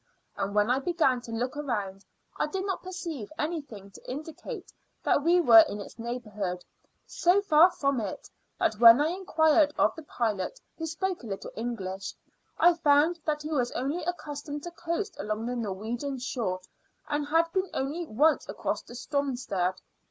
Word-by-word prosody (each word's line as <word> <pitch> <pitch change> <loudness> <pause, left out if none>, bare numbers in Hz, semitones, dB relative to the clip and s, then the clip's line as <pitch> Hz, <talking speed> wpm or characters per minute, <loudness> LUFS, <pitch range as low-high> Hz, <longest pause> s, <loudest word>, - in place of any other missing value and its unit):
And 200 +1 -3
when 210 +3 +3
I 260 - +3
began 275 -5 +1
to 235 - -9
look 245 +4 -2
around, 205 -9 -3 0.4
I - - +2
did 380 +5 -3
not 385 -2 -2
perceive 340 - -6
anything 280 - -4
to - - -13
indicate 300 +5 -7 0.3
that - - +3
we 345 +2 +5
were 230 -9 +9
in 205 - -5
its 205 - -10
neighbourhood. 210 -6 -4 0.4
So 355 +3 +3
far 325 -1 +7
from 275 -6 0
it, 205 -4 -5 0.3
that 215 - 0
when 230 +1 +9
I 300 +2 +2
inquired 315 -4 +3
of - - +3
the 320 - -8
pilot, 235 - -2 0.2
who 325 - -4
spoke 365 +3 -2
a 235 - -9
little 195 -2 -5
English, 195 -5 -4 0.4
I 350 - +6
found 320 +1 +3
that 300 -1 -1
he 305 - -5
was 250 -5 +1
only 285 +7 -2
accustomed 295 -4 -5
to 345 - -6
coast 345 +5 -3
along 215 +2 -3
the 245 +1 -2
Norwegian 235 +5 -3
shore; 230 -7 -2 0.5
and 295 0 -1
had 330 +2 +2
been 375 -1 0
only 305 +6 -3
once 305 +7 +2
across - - -2
to 240 - -11
Stromstad. 245 -9 -1
280 Hz, 170 wpm, -28 LUFS, 225-325 Hz, 0.5 s, were